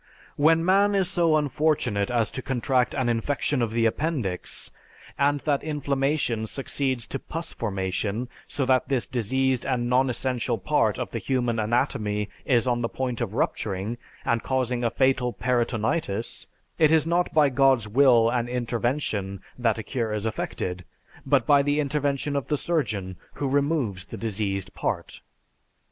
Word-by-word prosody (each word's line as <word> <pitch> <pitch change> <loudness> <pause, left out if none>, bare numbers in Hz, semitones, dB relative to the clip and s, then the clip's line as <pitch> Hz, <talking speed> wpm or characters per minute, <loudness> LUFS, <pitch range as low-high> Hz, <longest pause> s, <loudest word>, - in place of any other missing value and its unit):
When 165 +3 +4
man 200 +2 +4
is 190 -2 +2
so 170 -4 +3
unfortunate 145 -8 +1
as 120 -3 +1
to 130 - -5
contract 130 -1 0
an 130 -3 0
infection 125 +3 0
of 115 - +1
the 115 0 +1
appendix, 115 - -2 0.4
and 145 0 +2
that 145 -3 +1
inflammation 140 -5 0
succeeds 130 -1 -2
to 135 - -4
pus 165 +1 -5
formation 100 +2 -2 0.2
so 140 - 0
that 130 0 +2
this 130 -3 +1
diseased 130 +2 0
and 125 -3 -1
non 130 +1 +3
essential 125 -1 -1
part 95 - +1
of - - -4
the - - -3
human 120 -3 0
anatomy 105 -2 0 0.2
is 120 -2 +3
on 120 -1 +1
the 115 - -1
point 125 -2 -3
of 110 -2 -3
rupturing 105 +3 -2 0.3
and 115 -1 +1
causing 125 -2 -1
a 115 - +2
fatal 130 -1 +1
peritonitis, 115 -1 -1 0.3
it 155 -2 +6
is 160 -1 +4
not 170 +2 +1
by 150 -2 +4
God's 135 -4 +3
will 120 0 +5
and 120 -1 -1
intervention 120 -5 -2 0.2
that 115 -3 +1
a 110 - -4
cure 115 0 -2
is 105 0 -3
effected, 90 -4 -3 0.4
but 135 -3 +3
by 145 -1 +5
the 145 +1 +1
intervention 145 -1 -1
of 140 -3 -1
the 150 - 0
surgeon 105 - -2 0.2
who 140 - -2
removes 135 - 0
the - - -8
diseased 100 -3 -2
part. - - -3
125 Hz, 155 wpm, -25 LUFS, 115-140 Hz, 0.4 s, it